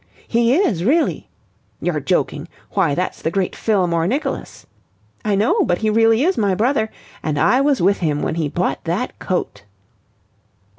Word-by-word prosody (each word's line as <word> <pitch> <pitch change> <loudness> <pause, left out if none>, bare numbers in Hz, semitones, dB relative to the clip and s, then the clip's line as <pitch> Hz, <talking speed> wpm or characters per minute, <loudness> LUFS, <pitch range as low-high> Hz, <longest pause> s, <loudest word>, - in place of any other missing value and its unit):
'He 235 +2 +2
is, 245 - +1
really.' 305 - +1 0.5
'You're - - -1
joking. - - -1 0.2
Why, 175 -8 +1
that's 180 +1 -3
the 160 - 0
great 185 +1 -1
Fillmore 175 -6 +1
Nicholas.' 270 +5 -3 0.6
'I 210 -2 +1
know. 205 +3 +2
But 175 - +1
he 220 -1 0
really 225 +2 +4
is 370 +4 +1
my 200 -3 +2
brother. 220 +1 +1 0.3
And 155 -2 -2
I 255 - +3
was 275 -7 +2
with 195 +2 +3
him 150 -4 -1
when - - -1
he 160 -2 -1
bought 175 +5 -2
that 180 +10 -3
coat.'" 175 - -3
200 Hz, 160 wpm, -20 LUFS, 175-240 Hz, 0.6 s, really